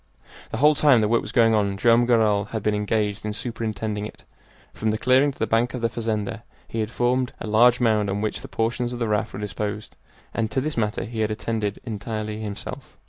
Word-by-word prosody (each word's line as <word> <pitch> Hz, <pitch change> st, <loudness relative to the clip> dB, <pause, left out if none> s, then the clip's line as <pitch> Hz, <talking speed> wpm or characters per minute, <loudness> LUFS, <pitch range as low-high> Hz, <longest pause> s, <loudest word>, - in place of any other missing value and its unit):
The -, -, -4 dB
whole 150 Hz, +2 st, +6 dB
time 145 Hz, -4 st, +5 dB
the 105 Hz, -, +2 dB
work 115 Hz, +2 st, +2 dB
was -, -, -7 dB
going 115 Hz, -2 st, +4 dB
on 100 Hz, -2 st, +1 dB
Joam 120 Hz, +3 st, +4 dB
Garral 110 Hz, -4 st, +3 dB
had 110 Hz, 0 st, -5 dB
been 105 Hz, -, +2 dB
engaged 105 Hz, 0 st, -1 dB
in 105 Hz, 0 st, -3 dB
superintending 105 Hz, -1 st, -3 dB
it. -, -, -15 dB, 0.5 s
From 110 Hz, -, -1 dB
the 110 Hz, -, 0 dB
clearing 130 Hz, +5 st, +4 dB
to -, -, -17 dB
the -, -, 0 dB
bank 115 Hz, +3 st, +1 dB
of 125 Hz, -, -5 dB
the 115 Hz, -, +1 dB
fazenda 110 Hz, -1 st, -3 dB, 0.3 s
he 115 Hz, -, -4 dB
had 110 Hz, -1 st, -1 dB
formed 125 Hz, +1 st, 0 dB
a -, -, -5 dB
large 120 Hz, +3 st, +5 dB
mound 110 Hz, -4 st, +2 dB
on 100 Hz, +1 st, -1 dB
which 110 Hz, 0 st, -2 dB
the -, -, -8 dB
portions 120 Hz, +2 st, -1 dB
of -, -, -4 dB
the 115 Hz, -1 st, -1 dB
raft 105 Hz, -1 st, 0 dB
were -, -, -7 dB
disposed, 105 Hz, +1 st, -4 dB, 0.4 s
and 110 Hz, -1 st, -1 dB
to 135 Hz, -, 0 dB
this 150 Hz, +3 st, -2 dB
matter 105 Hz, -2 st, -1 dB
he 115 Hz, 0 st, -6 dB
had 110 Hz, -1 st, +1 dB
attended 110 Hz, -1 st, -2 dB
entirely 110 Hz, -1 st, -4 dB
himself. 105 Hz, -2 st, -7 dB
110 Hz, 225 wpm, -24 LUFS, 105-120 Hz, 0.5 s, whole